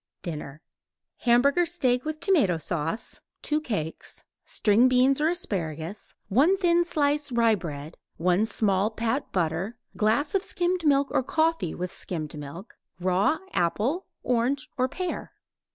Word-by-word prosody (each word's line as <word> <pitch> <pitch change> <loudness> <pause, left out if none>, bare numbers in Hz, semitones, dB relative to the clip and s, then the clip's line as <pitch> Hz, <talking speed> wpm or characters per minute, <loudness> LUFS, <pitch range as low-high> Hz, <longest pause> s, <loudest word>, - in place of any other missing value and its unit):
DINNER 155 -3 -6 0.5
Hamburger 265 +8 +4
steak 260 -6 0
with 310 0 -3
tomato 295 - +3
sauce 165 +5 -3 0.2
(2 300 0 +1
cakes); 165 - -4 0.2
string 220 +4 +3
beans 255 +2 +3
or 310 - +3
asparagus; 185 - -4
1 290 - +4
thin 345 -2 +3
slice 295 -3 +1
rye 230 -2 +4
bread; 155 -5 -5 0.2
1 180 +5 +2
small 200 -2 +1
pat 230 +4 -2
butter; 180 +6 -1 0.2
glass 225 +8 +1
of 390 - +2
skimmed 355 -4 0
milk 280 -1 +3
or - - +2
coffee 315 - 0
with 180 0 -4
skimmed 155 -5 -5
milk; 150 +8 -9 0.2
raw 185 - +2 0.2
apple, 230 - 0 0.2
orange 255 +5 0
or 255 -1 +1
pear. 365 +4 -4
235 Hz, 135 wpm, -26 LUFS, 180-300 Hz, 0.5 s, Hamburger